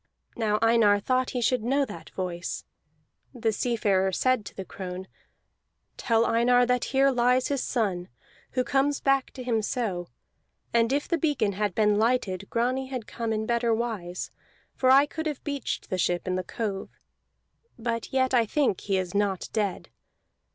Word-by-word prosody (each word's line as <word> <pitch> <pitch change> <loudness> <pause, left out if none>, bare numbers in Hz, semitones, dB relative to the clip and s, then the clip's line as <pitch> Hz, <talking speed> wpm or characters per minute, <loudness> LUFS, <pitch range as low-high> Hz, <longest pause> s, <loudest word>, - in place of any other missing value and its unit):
Now 215 -2 +1
Einar 225 -3 +5
thought 255 +4 +1
he 250 - -2
should 250 +1 +2
know 275 +4 +2
that 165 -9 -10
voice. 175 -2 -4 0.7
The 225 -2 0
seafarer 205 -4 +1
said 255 +2 +1
to - - -10
the 190 - -6
crone: 185 0 -7 0.9
"Tell 230 -1 +2
Einar 245 +2 +4
that 250 0 +1
here 275 +1 +3
lies 250 0 +2
his 280 -3 0
son, 190 -7 -1 0.5
who 255 - +1
comes 280 +2 +1
back 275 -1 +2
to 255 - -7
him 230 -3 +1
so; 200 -6 -2 0.7
and 230 0 +3
if 285 +1 0
the 335 - 0
beacon 290 -10 +1
had 200 -1 -2
been 210 -1 +3
lighted, 215 -5 0
Grani 255 +3 0
had 255 -4 -5
come 230 0 -4
in 220 0 -1
better 235 0 +1
wise, 210 -7 -4 0.4
for 260 - +1
I 275 +2 +7
could 320 +2 -4
have 295 -4 -4
beached 285 -4 -4
the 185 - -1
ship 175 +1 0
in 185 - 0
the 185 0 -1
cove. 200 0 -4 0.9
But 230 -1 -3
yet 260 0 +1
I 235 -3 +4
think 270 -7 +1
he 195 -1 0
is 185 -2 -3
not 200 -2 0
dead. 205 -4 -2
230 Hz, 170 wpm, -27 LUFS, 200-255 Hz, 0.9 s, I